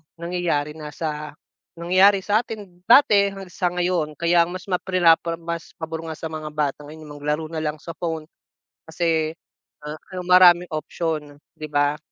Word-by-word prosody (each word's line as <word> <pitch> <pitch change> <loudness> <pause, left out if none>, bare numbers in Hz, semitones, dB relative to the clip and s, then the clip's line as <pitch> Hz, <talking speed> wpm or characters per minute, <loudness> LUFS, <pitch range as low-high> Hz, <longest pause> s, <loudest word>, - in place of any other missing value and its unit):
nangyayari 170 -4 -2
na 155 -1 -9
sa, 150 -1 -4 0.4
nangyari 185 +3 +4
sa 210 +1 +3
atin 205 -7 -8
dati 210 -6 +6
na 195 - -7
sa 180 0 -1
ngayon, 175 -4 -1
kaya 170 0 +3
ang 175 - -8
mas 185 - -7
ma 180 - +2
prinapra 170 -2 +3
mas 170 0 -6
pabor 160 0 -5
nga 160 - -5
sa 160 - -5
mga 155 -1 -6
bata 150 -1 -2
ngayon 155 +2 -11
yung 145 - -9
maglaro 150 +2 -2
na 160 0 -4
lang 150 -1 -3
sa 165 +2 -8
phone, 160 -3 -4 0.6
kasi 160 -1 0 0.5
a 150 +1 -5
a - - -20
'yung 180 - -7
maraming 180 -1 +7
option, 155 -2 -3 0.2
'di 155 - -7
ba? 145 +1 +1
165 Hz, 180 wpm, -23 LUFS, 155-180 Hz, 0.6 s, maraming